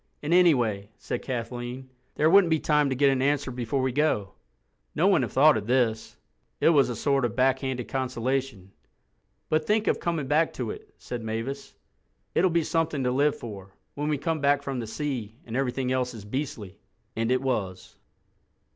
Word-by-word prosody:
"And, 150 +3 0
anyway," 120 - +3
said - - -4
Kathleen, 125 +1 -5 0.2
"there 155 - +3
wouldn't 185 +1 +6
be 160 -1 +2
time 150 -2 +2
to 130 - -1
get 140 +1 +4
an 130 -1 0
answer 140 -1 +1
before 125 +2 -2
we 130 - +1
go." 120 -9 0 0.6
No - - +2
one - - +4
had - - -2
thought - - +5
of 105 -1 -5
this. 120 -3 0 0.4
It - - +4
was 145 -6 +4
a 120 - -3
sort 140 +4 +1
of 120 -2 -1
backhanded 130 -1 0
consolation. 130 -5 -2 0.8
"But 155 0 0
think 215 +1 +2
of - - +1
coming 165 -4 -2
back 155 +4 +2
to 120 -4 -4
it," - - -11
said 120 -1 -6
Mavis: 115 +6 -5 0.6
"it'll 185 - +3
be 170 -1 +1
something 160 -4 -1
to 125 - +1
live 145 +3 +2
for, 100 -4 -9 0.2
when 145 +1 -3
we 150 - +1
come 160 +2 -2
back 140 0 +2
from 135 -2 -3
the 115 - -5
sea 120 -4 -4
and 115 - -6
everything 130 -1 -1
else 125 -1 -1
is 105 -2 -10
beastly." 105 -5 -5 0.4
And 115 +2 0
it 130 +1 +1
was. 100 -8 -3
130 Hz, 185 wpm, -26 LUFS, 115-145 Hz, 0.8 s, wouldn't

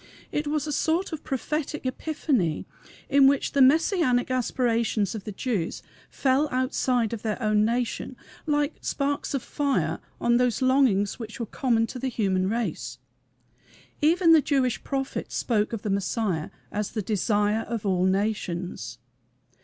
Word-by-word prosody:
It 295 0 -1
was 300 -1 0
a 300 - -3
sort 325 +5 0
of 310 - -5
prophetic 300 +1 -3
"Epiphany," 255 - -1 0.4
in 275 -1 +6
which 280 0 +2
the 280 - +2
Messianic 270 -3 +3
aspirations 235 -4 0
of 215 -4 -6
the 210 - -4
Jews 200 -5 -2 0.3
fell 275 +2 +1
outside 255 -2 0
of 225 - -4
their 215 0 -2
own 215 -2 +2
nation, 240 +2 -2 0.3
like 295 0 0
sparks 285 0 -1
of 270 - -2
fire 285 -2 -1 0.2
on 240 0 +3
those 250 -2 +1
longings 260 -7 +2
which 220 +1 -7
were 230 - -2
common 230 0 +1
to 250 +3 -7
the 265 - -2
human 195 -6 0
race. 180 - -3 1.0
Even 335 +3 +4
the 320 -2 +7
Jewish 265 -4 0
prophet 270 -1 -3
spoke 215 -3 0
of 225 -3 -4
the 210 - -1
Messiah 195 -4 -1 0.2
as 210 -1 -2
"The 215 -2 -2
Desire 210 +1 +1
of 230 -3 -3
all 185 -2 +2
Nations." 180 - -2
240 Hz, 150 wpm, -26 LUFS, 210-275 Hz, 1.0 s, the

